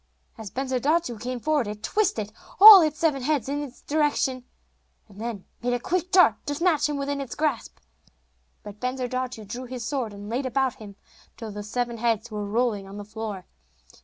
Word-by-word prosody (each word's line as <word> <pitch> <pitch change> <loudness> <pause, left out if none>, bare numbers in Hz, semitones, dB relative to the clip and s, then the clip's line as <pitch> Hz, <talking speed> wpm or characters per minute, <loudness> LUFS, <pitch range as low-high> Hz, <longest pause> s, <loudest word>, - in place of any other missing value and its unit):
As 220 -3 -8
Bensurdatu 265 - -1
came 250 +2 -4
forward 295 -2 0
it 210 +1 -7
twisted 235 - 0 0.3
all 410 -1 +12
its 310 -2 0
seven 300 -4 +1
heads 280 -2 0
in 285 +1 -2
his 270 -4 -9
direction, 285 -4 0 0.6
and 205 0 -13
then 225 -5 -5 0.2
made 245 +1 0
a 245 - 0
quick 360 +7 -2
dart 370 -1 +5
to 290 - -1
snatch 310 -2 +2
him 295 - -2
within 280 0 -2
its 265 -4 -6
grasp. 295 -6 -2 0.9
But 205 0 -10
Bensurdatu 255 -2 -3
drew 240 +6 -6
his 250 -1 -6
sword 250 -4 -2
and 205 0 -10
laid 250 +5 -2
about 260 0 0
him, 205 -2 -11 0.4
till 225 -2 -7
the 205 0 -6
seven 235 +2 -3
heads 230 0 0
were 210 -1 -4
rolling 215 -2 -1
on 195 +1 -9
the 205 - -7
floor. 210 -3 -6
250 Hz, 185 wpm, -25 LUFS, 220-290 Hz, 0.9 s, all